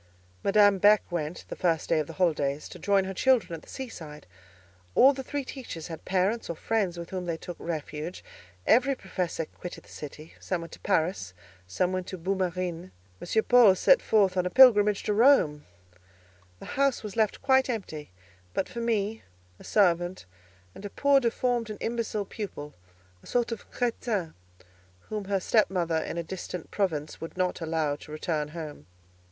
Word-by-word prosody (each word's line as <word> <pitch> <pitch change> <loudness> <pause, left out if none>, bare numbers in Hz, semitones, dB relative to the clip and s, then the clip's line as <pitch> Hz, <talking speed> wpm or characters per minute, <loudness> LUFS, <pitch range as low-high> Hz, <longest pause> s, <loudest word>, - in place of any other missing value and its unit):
Madame 205 -1 +5
Beck 210 +2 +6
went, 165 -1 -4
the - - -5
first 165 -3 0
day 165 - +3
of 150 - -2
the - - -8
holidays, 150 -5 0
to 180 - -11
join 200 +2 +2
her 190 0 -4
children 245 -3 +2
at 165 - -6
the - - -18
sea 265 -1 -6
side; 150 -9 -10 0.7
all 275 +2 +7
the 265 - -5
three 280 +1 -4
teachers 235 - -7
had 165 - -8
parents 195 +5 0
or 170 - -3
friends 195 -1 -1
with 170 0 -7
whom 185 -1 -3
they 165 -1 -2
took 175 +1 -8
refuge; 155 0 -5 0.4
every 265 +4 +4
professor 180 -6 -3
quitted 175 +3 -9
the - - -20
city; 155 +2 -9
some 180 -3 -2
went 165 - -9
to - - -11
Paris, 155 - -1 0.3
some 180 - -1
to 185 - -7
Boue 185 +3 -1
Marine; 180 -1 -3 0.3
M. 220 +5 +1
Paul 240 -6 +6
set - - +5
forth 200 -4 +3
on 180 -1 +1
a - - -2
pilgrimage 210 -4 +6
to 210 - 0
Rome; 210 - +4 0.9
the - - -11 0.2
house 275 -4 +2
was 210 -3 -6
left 220 -2 0
quite 265 -1 +4
empty, 170 -10 -5 0.5
but - - 0
for 235 - -7
me, 225 -2 -1 0.4
a - - -13
servant, 175 - +1 0.5
and - - -12
a 205 - -5
poor 280 +5 +3
deformed 240 -1 0
and 210 - -6
imbecile 225 -3 -2
pupil, 190 -8 -7 0.5
a - - -16
sort 240 -1 0
of 230 - -6
crétin, 225 -8 -2 0.8
whom 210 -2 -4
her 195 0 0
stepmother 180 -5 +1
in 160 - -3
a 170 - -1
distant 180 0 -7
province 155 -7 -2
would 165 +2 -7
not 180 -1 -1
allow 160 -3 0
to 150 - -13
return 155 -1 -2
home. 150 - -8
185 Hz, 180 wpm, -28 LUFS, 165-220 Hz, 0.9 s, all